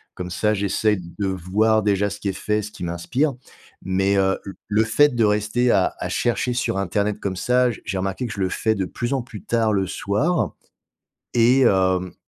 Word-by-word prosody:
Comme 90 0 -5
ça 105 +5 +1
j'essaye 100 +1 +1 0.2
de 100 -2 -1
voir 100 +4 +1
déjà 100 0 +1
ce 100 - -7
qui 100 - -4
est 95 - 0
fait 105 +2 0
et - - -2
ce 105 +1 -7
qui - - -9
m'inspire. 120 - -1 0.5
Mais, 95 +2 +1
heu, 95 0 +2
l 100 - -6 0.2
le 105 +1 +2
fait 125 +4 +3
de 115 - +2
rester 105 +4 +2
à 95 - +2
à - - -4
chercher 120 +1 0
sur 115 -5 -1
Internet 100 +2 -1
comme 95 -2 -3
ça, 125 +2 +2
j - - -9
j'ai 95 - -3
remarqué 95 +6 -2
que 110 - -6
je 100 - -5
le 95 - +1
fais 110 +3 0
de 95 - -1
plus 120 +7 -3
en 135 - 0
plus 115 -4 -10
tard 115 -2 +1
le 95 -2 0
soir 135 - -1 0.8
et 125 +3 +4
hem, 95 -4 +2
105 Hz, 215 wpm, -22 LUFS, 95-115 Hz, 0.8 s, et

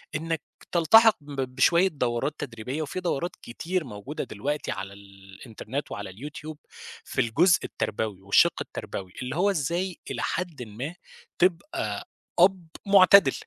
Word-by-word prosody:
إنّك 160 +1 -2 0.3
تلتحق 220 +6 +6
ب 145 -2 -5
بشوية 170 +8 +5
دورات 125 -3 -1
تدريبيّة، 125 +2 -4
وفي 155 +4 -4
دورات 175 -1 -2
كتير 170 +9 -3
موجودة 120 +3 -6
دلوقتي 140 +5 -3
على 95 -1 -5
الإنترنت 100 +6 -8
وعلى 100 -1 -5
اليوتيوب، 150 +8 -8 0.5
في 130 - -1
الجزء 160 +11 +4
التربوي، 105 -3 -3
والشَق 100 +1 +4
التربوي، 95 -2 -6
اللي 125 +3 -4
هو 195 +4 +3
إزاي 175 +2 -1
إلى - - -3
حدٍ 170 -7 -3
ما 125 +9 -6 0.4
تبقى 190 - 0 0.3
أب 180 -1 +4 0.2
مُعتدل، 195 -6 +7
145 Hz, 130 wpm, -26 LUFS, 110-175 Hz, 0.5 s, مُعتدل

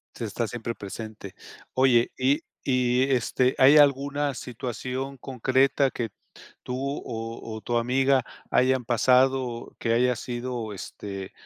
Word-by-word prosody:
Se 115 - -4
está 110 +3 -2
siempre 115 +2 -5
presente. 105 0 -8 0.4
Oye, 125 -2 +4
y 135 +5 +2 0.2
y, 125 -1 +2
eh 135 -1 +2
este, 125 +2 +1
¿hay 140 +3 +7
alguna 140 0 +3
situación 130 +3 -5
concreta, 130 +2 +1
que 115 -3 -4 0.6
tú, 125 - -4 0.3
o 115 -1 -6
o - - -7
tu 120 +2 -2
amiga 130 +2 +2 0.3
hayan 130 -1 +3
pasado, 130 +3 +3
o 120 -1 -8
que 115 - 0
haya 125 +1 +3
sido, 120 -2 -4
este, 100 0 -7
125 Hz, 135 wpm, -26 LUFS, 115-130 Hz, 0.6 s, hay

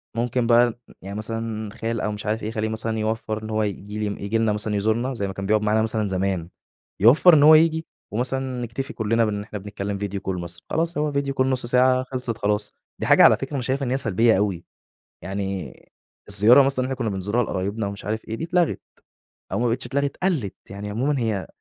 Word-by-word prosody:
ممكن 120 0 0
بقى 120 0 +4 0.2
يعني 100 +2 -7
مثلًا 110 -1 -3
خال 115 0 -3
أو 105 - -1
مش 105 +1 -7
عارف 110 +1 -1
إيه، 110 - -3
خالي 110 -1 -2
مثلًا 110 0 -2
يوفّر 110 0 -2
إن 110 - -6
هو 110 0 0
ييجي 105 +1 -5
لي 100 - -6
ييجي 100 +3 -1
لنا 110 -2 +2
مثلًا 105 0 -1
يزورنا 110 +6 0
زي 100 -4 -3
ما 95 - -5
كان 100 0 -5
بيقعد 105 +1 +2
معانا 105 +1 +2
مثلًا 110 -1 0
زمان، 95 -2 -2 0.5
يوفّر 140 - +7
إن 145 -2 +6
هو 155 +1 +9
ييجي 160 0 +3 0.3
ومثلا 130 +2 -2
نكتفي 120 +3 -5
كلنا 115 +1 +1
بإن 105 -1 -2
إحنا 105 -1 -7
بنتكلم 100 0 -5
Video 100 -1 -4
Call 90 -1 -2
مثلا، 85 0 -7
خلاص 165 0 -1
هو 150 0 0
Video 140 -1 -1
Call - - +5
نُصّ 130 -2 0
ساعة 130 +1 +3
خلصت 125 -3 -4
خلاص، 105 0 -1 0.3
دي - - -2
حاجة - - +6
على - - +7
فكرة 135 +2 -6
أنا 135 - -1
شايف 135 +3 -1
إن 125 - -2
هي 135 - +1
سلبية 115 -2 +2
أوي، 95 -4 -1 0.6
يعني 95 -5 -4 0.5
الزيارة 105 +7 +7
مثلًا 135 -1 +1
اللي - - -3
إحنا - - -4
كنا - - 0
بنزورها 105 +6 0
لقرايبنا 100 +2 -3
ومش 100 -1 -7
عارف 110 +1 -3
إيه، 110 - -3
دي 160 - -6
اتلغت، 175 -1 +1 0.7
أو - - -1
ما 120 - +1
بقِتش 125 +3 -1
اتلغت 140 0 -2
قَلِّت 150 - 0
يعني 100 +1 -6
عمومًا 130 +6 0
هي 110 -5 -2
110 Hz, 220 wpm, -23 LUFS, 105-130 Hz, 0.7 s, هو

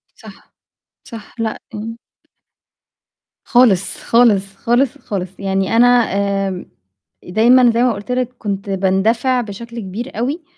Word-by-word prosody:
صح، - - -16 0.5
صح. 225 -4 -11
لأ، 225 -1 -3
امم. 225 +2 -6 1.5
خالص، 235 -7 +3
خالص، 205 -5 +3
خالص، 240 +5 0
خالص. 190 -3 -5
يعني 195 +1 -1
أنا، 240 +2 +6 0.6
آمم، 185 -2 -5 0.6
دايمًا 235 +6 +4
زي 235 +1 +1
ما 250 -2 +2
قُلت 205 +3 -7
لك 250 0 -1
كنت 200 -2 -4
باندفع 200 +7 +1
بشكل 235 +2 -8
كبير 220 +6 -7
أوي، 280 +9 -2
225 Hz, 120 wpm, -17 LUFS, 195-245 Hz, 1.5 s, أنا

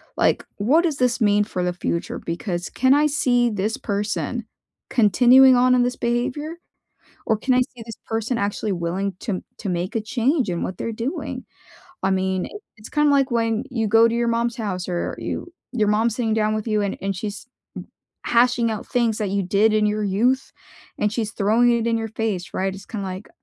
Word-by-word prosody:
Like, - - +1
what 270 +12 +3
does 320 -5 0
this 250 -1 +1
mean 205 -2 +3
for 185 -3 -3
the 180 0 0
future? 170 -1 -3
Because, 175 +1 -4
can 260 +1 +3
I 295 +1 +4
see 245 -4 +2
this 210 +1 -2
person 210 +3 -2 0.5
continuing 250 +4 +6
on 250 +1 +4
in 250 - +4
this 245 0 0
behavior, 255 +7 -2 0.7
or 220 - +2
can 255 +4 +1
I - - +4
see 250 -1 -2
this 225 -1 -9
person 225 +2 -1
actually 205 +1 -2
willing 185 +2 -2
to 215 - -3
m 185 - -4
to 210 - -5
make 180 +3 -2
a - - +1
change 255 +4 0
in 175 -1 -2
what 185 - -4
they're 230 - -3
doing? 235 +9 -4 0.6
I 190 - +2
mean, 190 -1 0
i - - -8 0.3
it's 210 - -11
kinda 295 -1 +3
like 275 -1 +3
when 230 0 0
you 230 -4 -1
go 225 +2 +6
to 230 - -1
your 235 0 +1
mom's 235 0 0
house, 195 -7 -3
or 175 -2 -2
you 350 - -5 0.2
your 215 -4 +1
mom's 220 +2 +2
sitting 225 -3 0
down 215 0 +1
with 215 - -3
you, 215 -1 +1
and 200 -1 -2
and 195 0 -1
she's 205 +3 -6 0.8
hashing 240 -1 +3
out 215 - -6
things 235 -4 +1
that 210 -3 -2
you 200 0 0
did 205 +4 +3
in 215 0 +3
your 210 0 0
youth, 240 +7 +1 0.5
and 210 0 0
she's 220 -2 -2
throwing 225 +4 +3
it 235 -1 0
in 230 0 +2
your 225 0 -3
face, 215 -4 -3
right, 190 0 -1
it's 195 +1 -11
kinda 200 -4 -5
like, 185 +2 -7
220 Hz, 205 wpm, -22 LUFS, 200-245 Hz, 0.8 s, continuing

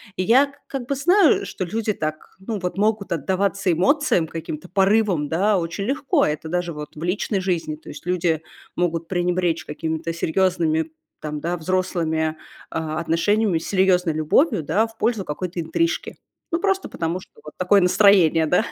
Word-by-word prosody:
И 185 - -1
я 270 +7 +4
как 265 -3 -5
бы 280 - 0
знаю, 350 +5 +4
что 185 - -4
люди 215 +4 -1
так, 155 -3 -5
ну, 210 +3 -4
вот 180 +1 -4
могут 210 0 0
отдаваться 190 +4 0
эмоциям, 185 - +2
каким-то 160 +1 -7
порывам, 195 -4 +2
да, 195 +7 +2
очень 165 +2 -3
легко. 280 - +1
Это 150 +1 -3
даже 175 +1 -2
вот 150 -2 -8
в 155 - -7
личной 190 +2 -1
жизни. 170 -4 -1
То 155 - -14
есть 145 - -10
люди 175 -3 0 0.4
могут 170 -2 -1
пренебречь 175 -2 0
какими-то 160 +2 -3
серьезными 165 -2 0 0.3
там, 150 -1 -5
да, 170 +3 -2
взрослыми, 160 -3 -1 0.3
а, 155 -1 -3
отношениями, 175 +4 +1
серьезной 180 -1 +2
любовью, 165 - +2
да, 210 +9 +1
в 225 0 -19
пользу 225 -4 0
какой-то 180 +3 -4
интрижки. 335 - -1 0.3
Ну, 335 - +1
просто 385 +1 0
потому, 165 +2 -2
что - - -17
вот 150 - -10
такое 185 +2 +4
настроение, 180 -4 +5
да, 180 +8 +2
180 Hz, 165 wpm, -22 LUFS, 160-205 Hz, 0.4 s, настроение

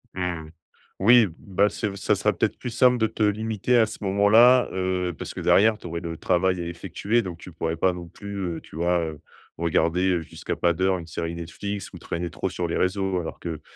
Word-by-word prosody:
Mmh, 90 -4 -3 0.5
oui, 115 +2 +6
bah, 100 +1 +1
c'est 105 - -3
v 100 - -5
ça 100 +1 +1
sera 105 +2 +1
peut-être 100 +4 -1
plus 125 - -5
simple 125 +2 +4
de 110 -1 +2
te 110 - -2
limiter 110 +3 +1
à 115 - +5
ce 110 - -8
moment-là, 110 +6 +5
heu, 90 -1 -1
parce - - -6
que - - -7
derrière, 110 +2 +4
tu 90 - -9
aurais 85 0 -4
le 85 -1 -5
travail 90 +1 +1
à - - -4
effectuer 95 +6 -1
donc 90 -6 -6
tu 90 - -11
pourrais 80 0 -2
pas 90 +2 +2
non 90 -1 -8
plus, 100 +2 -8 0.2
heu, - - -9
tu - - -15
vois? 85 +2 +1
Heu, 80 -3 -4 0.4
regarder 85 +2 +1
jusqu'à - - -5
pas 85 -1 +2
d'heure 95 +2 +1
une 85 -2 -9
série 85 0 -4
Netflix 95 +4 -6
ou - - -8
traîner 85 +1 -4
trop 95 - -3
sur 90 -1 -3
les 85 - -2
réseaux. 95 0 0
Alors 80 - -6
que, 80 -3 -5
95 Hz, 220 wpm, -25 LUFS, 85-105 Hz, 0.5 s, oui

